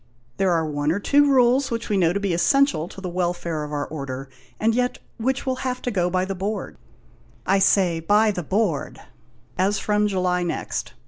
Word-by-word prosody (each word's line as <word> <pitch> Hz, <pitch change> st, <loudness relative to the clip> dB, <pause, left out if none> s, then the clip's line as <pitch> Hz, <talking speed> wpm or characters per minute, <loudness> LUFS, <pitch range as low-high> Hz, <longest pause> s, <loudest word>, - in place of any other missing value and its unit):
There 195 Hz, -1 st, +2 dB
are 165 Hz, -2 st, +1 dB
one 145 Hz, 0 st, -1 dB
or 190 Hz, -, 0 dB
two 290 Hz, +7 st, +4 dB
of -, -, +2 dB
our 275 Hz, -, +4 dB
rules 255 Hz, +2 st, +4 dB
which 230 Hz, -1 st, -3 dB
we 210 Hz, -, 0 dB
know 175 Hz, -4 st, +3 dB
to 200 Hz, -, -1 dB
be 200 Hz, -3 st, -1 dB
essential 275 Hz, -, +2 dB
to 195 Hz, -, -11 dB
the 190 Hz, -, -5 dB
welfare 175 Hz, -3 st, -2 dB
of 150 Hz, -, -7 dB
our 145 Hz, -1 st, -2 dB
Order, 135 Hz, -3 st, -6 dB, 0.3 s
and 225 Hz, +1 st, +2 dB
yet 250 Hz, +1 st, 0 dB, 0.2 s
which 265 Hz, +5 st, -1 dB
will 260 Hz, -1 st, -1 dB
have 255 Hz, -1 st, -3 dB
to 245 Hz, -, -1 dB
go 180 Hz, -4 st, +1 dB
by 185 Hz, +1 st, 0 dB
the 195 Hz, -, -3 dB
board 200 Hz, +3 st, -4 dB, 0.3 s
— -, -, -30 dB, 0.3 s
I 195 Hz, +1 st, +3 dB
say 185 Hz, -4 st, +3 dB
by 210 Hz, +6 st, +3 dB
the 180 Hz, -, -4 dB
board 185 Hz, -2 st, -1 dB, 0.3 s
— -, -, -34 dB
as 200 Hz, +3 st, +2 dB
from 210 Hz, 0 st, +1 dB
July 180 Hz, -2 st, 0 dB
next. 175 Hz, -1 st, -3 dB
195 Hz, 220 wpm, -23 LUFS, 170-225 Hz, 0.3 s, two